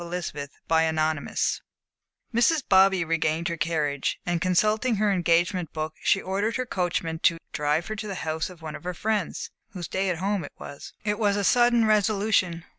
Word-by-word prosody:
Chapter 175 Hz, +1 st, -4 dB
XXXI 155 Hz, 0 st, -1 dB, 0.7 s
Mrs. 265 Hz, +6 st, +3 dB
Bobby 190 Hz, -2 st, +5 dB
regained 160 Hz, 0 st, 0 dB
her 170 Hz, -, -2 dB
carriage, 155 Hz, -4 st, -1 dB
and 175 Hz, -1 st, -1 dB
consulting 215 Hz, +6 st, +2 dB
her 210 Hz, 0 st, +2 dB
engagement 175 Hz, -1 st, +1 dB
book, 155 Hz, 0 st, -3 dB
she -, -, +3 dB
ordered 200 Hz, +4 st, -1 dB
her 255 Hz, -, -1 dB
coachman 175 Hz, -5 st, -2 dB
to 170 Hz, 0 st, +3 dB
drive 150 Hz, +3 st, 0 dB
her 215 Hz, -, -4 dB
to 210 Hz, +1 st, -5 dB
the 195 Hz, -, -4 dB
house 160 Hz, +1 st, -2 dB
of 175 Hz, -3 st, -14 dB
one 155 Hz, -1 st, -5 dB
of 155 Hz, -, -10 dB
her 180 Hz, 0 st, -4 dB
friends, 210 Hz, -1 st, -2 dB, 0.2 s
whose 180 Hz, -4 st, -5 dB
"day 190 Hz, 0 st, -1 dB
at 175 Hz, -, -1 dB
home" 195 Hz, +1 st, -1 dB
it 145 Hz, -, -9 dB
was. 145 Hz, -, -9 dB
It 210 Hz, 0 st, -1 dB
was 205 Hz, -2 st, +2 dB
a 205 Hz, -, 0 dB
sudden 240 Hz, +1 st, +4 dB
resolution. 205 Hz, -5 st, +2 dB
180 Hz, 180 wpm, -26 LUFS, 160-205 Hz, 0.7 s, Bobby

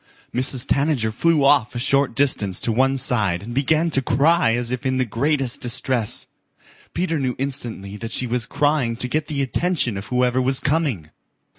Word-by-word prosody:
Mrs. 130 Hz, 0 st, +3 dB
Tanager 140 Hz, -6 st, 0 dB
flew 165 Hz, +3 st, +2 dB
off 135 Hz, -4 st, +3 dB
a -, -, -2 dB
short 135 Hz, -1 st, +1 dB
distance 105 Hz, -9 st, +1 dB
to 115 Hz, -, 0 dB
one 135 Hz, +4 st, +1 dB
side 105 Hz, -9 st, +1 dB
and 120 Hz, +3 st, -7 dB
began 155 Hz, +5 st, +1 dB
to 135 Hz, -, +2 dB
cry 140 Hz, -1 st, +2 dB
as 120 Hz, 0 st, 0 dB
if 125 Hz, +1 st, -4 dB
in 130 Hz, -1 st, -1 dB
the 130 Hz, -, +1 dB
greatest 135 Hz, +2 st, -1 dB
distress. 125 Hz, -2 st, 0 dB, 0.7 s
Peter 165 Hz, -3 st, -1 dB
knew 130 Hz, -2 st, -2 dB
instantly 115 Hz, -7 st, -3 dB
that 115 Hz, +2 st, -7 dB
she 125 Hz, -, +1 dB
was 120 Hz, 0 st, -2 dB
crying 145 Hz, -6 st, 0 dB
to 125 Hz, -, -1 dB
get 150 Hz, +3 st, -2 dB
the 140 Hz, -2 st, -2 dB
attention 135 Hz, -, -1 dB
of 100 Hz, -, -7 dB
whoever 125 Hz, 0 st, +1 dB
was 130 Hz, +1 st, +1 dB
coming. 140 Hz, -, -1 dB
130 Hz, 180 wpm, -21 LUFS, 115-140 Hz, 0.7 s, Mrs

